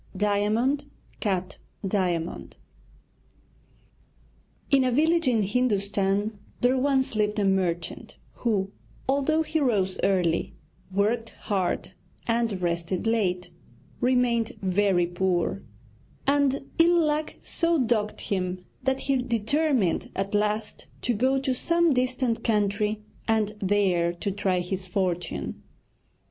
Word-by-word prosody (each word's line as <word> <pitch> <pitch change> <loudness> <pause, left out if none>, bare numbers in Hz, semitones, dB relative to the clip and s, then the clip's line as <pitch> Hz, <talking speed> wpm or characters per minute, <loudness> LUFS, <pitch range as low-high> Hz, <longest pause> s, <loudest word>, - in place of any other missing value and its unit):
DIAMOND 210 +8 +1 0.3
CUT 190 -2 -2 0.3
DIAMOND 180 -4 -1 2.2
In 275 -2 +5
a 255 - +2
village 320 +4 +3
in 230 -4 +3
Hindustan 205 -2 0 0.2
there 250 +2 +4
once 265 -1 +1
lived 210 0 +1
a 205 - +2
merchant 185 -3 -1 0.2
who, 200 -5 0 0.4
although 285 +4 +2
he 320 0 -1
rose 205 -9 +1
early, 180 -4 +1 0.4
worked 220 +4 +1
hard, 190 -4 -1 0.3
and 230 -5 0
rested 170 +2 -1
late, 190 -6 0 0.5
remained 245 -2 +2
very 190 -1 +2
poor; 175 +1 0 0.6
and 280 -1 +2
ill 340 0 +5
luck 305 +1 -1
so 335 0 +1
dogged 230 -5 0
him 185 -2 -2 0.2
that 265 +1 0
he 275 -1 +1
determined 250 - +1
at 195 +1 -2
last 210 +1 -1 0.2
to 245 - +1
go 260 +5 +2
to 265 -1 0
some 335 +4 +2
distant 255 -2 0
country 210 -1 0 0.2
and 220 -2 +1
there 185 -4 +2
to 200 +4 -3
try 190 -2 0
his 185 +1 -4
fortune. 175 - -2
210 Hz, 110 wpm, -26 LUFS, 190-255 Hz, 2.2 s, In